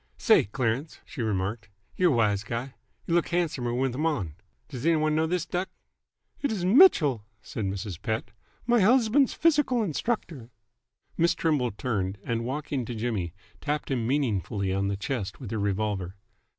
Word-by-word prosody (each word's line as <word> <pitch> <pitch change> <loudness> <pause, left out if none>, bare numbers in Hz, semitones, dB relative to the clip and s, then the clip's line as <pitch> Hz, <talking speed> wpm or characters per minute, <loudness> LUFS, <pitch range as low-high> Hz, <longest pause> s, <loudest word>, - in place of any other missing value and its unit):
"Say, - - +5
Clarence," 125 +7 -2
she 135 - -7
remarked, 105 +1 -2 0.3
"y're 180 -1 +4
a - - +2
wise 105 -3 +2
guy. 120 +4 -4 0.3
Y' - - -5
look 175 - +3
handsomer 160 -9 -1
with 130 +1 0
'em 150 +6 0
on. 100 - -2 0.3
Does 130 -4 -7
any 165 +1 +4
one 155 0 +1
know 160 +1 +2
this 175 0 -1
duck?" 180 +2 -2 0.7
"It 280 - 0
is 190 -5 -2
Mitchell," 180 - +6 0.2
said 110 - -4
Mrs. 95 -2 -4
Pett. 110 -2 -2 0.3
"My 240 0 +4
husband's 245 +5 +4
physical 295 -7 +3
instructor." 165 - -3 0.7
Miss 170 +1 +3
Trimble 150 -8 +1
turned, 100 -3 -2
and, 115 -1 -2
walking 140 +1 -3
to 120 - -5
Jimmy, 110 -7 -2 0.3
tapped 150 -1 -2
him 120 -4 0
meaningly 105 -7 0
on 100 +1 0
the 100 0 -1
chest 100 -2 -4
with 125 -7 -7
her 110 - -2
revolver. 100 -2 -1
125 Hz, 165 wpm, -27 LUFS, 105-165 Hz, 0.7 s, Mitchell